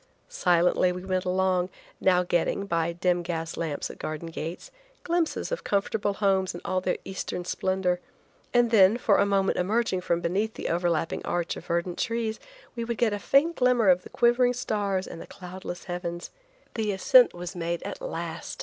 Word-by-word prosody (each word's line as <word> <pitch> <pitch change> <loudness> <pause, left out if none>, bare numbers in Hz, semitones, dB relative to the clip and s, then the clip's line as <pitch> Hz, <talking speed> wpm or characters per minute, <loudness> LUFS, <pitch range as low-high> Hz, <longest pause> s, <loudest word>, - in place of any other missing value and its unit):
Silently 180 0 +3
we 180 +1 -6
went 185 -1 -1
along, 185 0 +1 0.3
now 180 -1 +3
getting, 175 +3 0
by 170 -3 0
dim 175 +1 +1
gas 165 -1 -4
lamps 155 -4 -3
at - - -14
garden 155 +2 -5
gates, 165 +2 -6 0.3
glimpses 340 +4 -1
of - - -3
comfortable 205 +1 0
homes 190 -3 +1
in 175 - -7
all 185 0 0
their 180 - 0
Eastern 190 -2 -4
splendor, 185 0 0 0.5
and 240 -1 +3
then, 205 0 +6
for 220 -4 +3
a 200 - +3
moment 195 -1 +1
emerging 195 0 +1
from 170 -1 0
beneath 200 +6 -1
the - - -4
over 175 +1 +1
lapping 165 0 -1
arch 175 -1 -1
of - - -10
verdant 170 +1 -1
trees, 230 -1 -1 0.4
we 235 - -3
would 235 -1 -3
get 225 -2 +2
a 205 - -2
faint 280 - +3
glimmer 250 -5 +4
of 180 0 +5
the - - -12
quivering 245 +1 +3
stars 205 -6 -1
and 165 - -9
cloudless 180 -1 -8
heavens. 175 -1 -5 0.4
The 220 -3 -1
ascent 245 +5 +5
was 175 +1 -6
made 170 0 -3
at - - -6
last. - - -5
185 Hz, 180 wpm, -27 LUFS, 175-220 Hz, 0.5 s, then